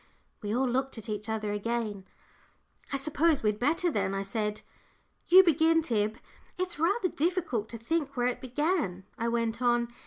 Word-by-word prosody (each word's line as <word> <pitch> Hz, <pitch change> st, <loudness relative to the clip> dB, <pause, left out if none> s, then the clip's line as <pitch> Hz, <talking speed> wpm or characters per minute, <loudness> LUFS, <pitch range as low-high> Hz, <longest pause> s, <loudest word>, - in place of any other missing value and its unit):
We 205 Hz, -2 st, -3 dB
all 260 Hz, +1 st, +2 dB
looked 260 Hz, +1 st, -1 dB
at 225 Hz, +1 st, -8 dB
each 210 Hz, +1 st, -3 dB
other 215 Hz, -1 st, -2 dB
again. 210 Hz, -2 st, -2 dB, 0.9 s
"I 275 Hz, -, 0 dB
suppose 305 Hz, +1 st, +1 dB
we'd 210 Hz, -1 st, +1 dB
better, 330 Hz, +7 st, +2 dB
then," 195 Hz, -5 st, -1 dB
I 195 Hz, -, -1 dB
said. 210 Hz, +1 st, -2 dB, 0.7 s
"You 375 Hz, +2 st, +9 dB
begin, 325 Hz, -1 st, +4 dB
Tib. 215 Hz, -5 st, 0 dB, 0.4 s
It's 365 Hz, -4 st, -2 dB
rather 375 Hz, +5 st, +2 dB
difficult 320 Hz, -, -1 dB
to 230 Hz, -, -6 dB
think 280 Hz, +3 st, -2 dB
where 245 Hz, -, +1 dB
it 250 Hz, -, -1 dB
began," 260 Hz, -, -1 dB, 0.2 s
I 230 Hz, -, 0 dB
went 230 Hz, 0 st, -1 dB
on. 240 Hz, -1 st, +2 dB
240 Hz, 165 wpm, -29 LUFS, 215-315 Hz, 0.9 s, You